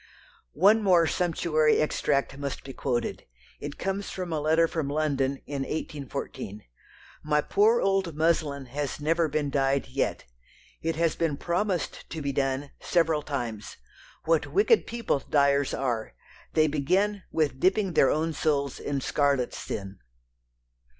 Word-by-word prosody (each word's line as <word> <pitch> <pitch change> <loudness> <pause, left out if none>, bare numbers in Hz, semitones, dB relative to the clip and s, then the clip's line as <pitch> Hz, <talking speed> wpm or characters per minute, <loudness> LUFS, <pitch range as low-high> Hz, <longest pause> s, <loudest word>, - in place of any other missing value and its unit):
One 210 +6 +5
more 180 -5 +5
sumptuary 160 -2 +2
extract 140 -2 0
must 140 0 -5
be 135 - -8
quoted; 120 - -2 0.3
it 145 0 -6
comes 195 +1 -3
from 180 -3 -4
a 155 - 0
letter 160 +2 +3
from 160 -4 -2
London 140 -2 0
in 140 -1 -4
1814: 135 -8 -5 0.6
"My 150 0 +2
poor 215 +9 +3
old 195 -5 +1
muslin 155 -3 +1
has 140 +3 -4
never 165 +2 +2
been 150 -1 -1
dyed 135 0 +1
yet. 135 +1 -1 0.6
It 165 0 -1
has 165 0 +1
been 160 -4 0
promised 180 +2 -2
to 165 - -5
be 140 -2 -2
done 135 +1 -1
several 165 -3 +1
times. 120 -8 -5 0.5
What 165 -1 +2
wicked 425 +3 +3
people 230 -10 -1
dyers 140 -1 +2
are. 115 - -2 0.4
They 155 - +4
begin 185 +8 +1
with 145 -5 0
dipping 190 +1 +2
their 135 - +5
own 160 +2 0
souls 140 -3 0
in 140 -1 -2
scarlet 140 -3 +1
sin." 95 -1 -6
150 Hz, 140 wpm, -27 LUFS, 140-170 Hz, 0.6 s, One